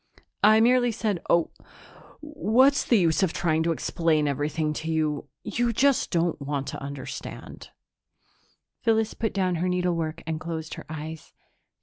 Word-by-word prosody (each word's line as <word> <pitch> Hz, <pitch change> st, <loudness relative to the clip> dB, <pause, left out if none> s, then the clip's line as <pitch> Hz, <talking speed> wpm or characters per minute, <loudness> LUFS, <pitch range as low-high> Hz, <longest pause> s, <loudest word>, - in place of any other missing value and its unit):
"I 215 Hz, +1 st, +7 dB
merely 245 Hz, +1 st, +4 dB
said... 210 Hz, -5 st, -2 dB
oh, 170 Hz, -1 st, +3 dB, 0.7 s
what's 280 Hz, -3 st, +3 dB
the 235 Hz, -, +3 dB
use 165 Hz, -5 st, +2 dB
of 185 Hz, -3 st, +1 dB
trying 160 Hz, -2 st, +1 dB
to 165 Hz, +1 st, +1 dB
explain 160 Hz, -2 st, +1 dB
everything 150 Hz, +2 st, -1 dB
to 160 Hz, 0 st, -3 dB
you? 155 Hz, -2 st, -1 dB, 0.2 s
You 240 Hz, -1 st, 0 dB
just 270 Hz, +3 st, +2 dB
don't 170 Hz, -3 st, 0 dB
want 140 Hz, -1 st, -2 dB
to -, -, -7 dB
understand." 140 Hz, -1 st, -8 dB, 1.1 s
Phyllis 225 Hz, -1 st, +1 dB
put 225 Hz, -2 st, -2 dB
down 185 Hz, -3 st, 0 dB
her 180 Hz, -, +1 dB
needlework 170 Hz, -3 st, -1 dB
and 160 Hz, -1 st, -3 dB
closed 160 Hz, -1 st, -5 dB
her -, -, -9 dB
eyes. 160 Hz, 0 st, -7 dB
170 Hz, 145 wpm, -26 LUFS, 155-220 Hz, 1.1 s, I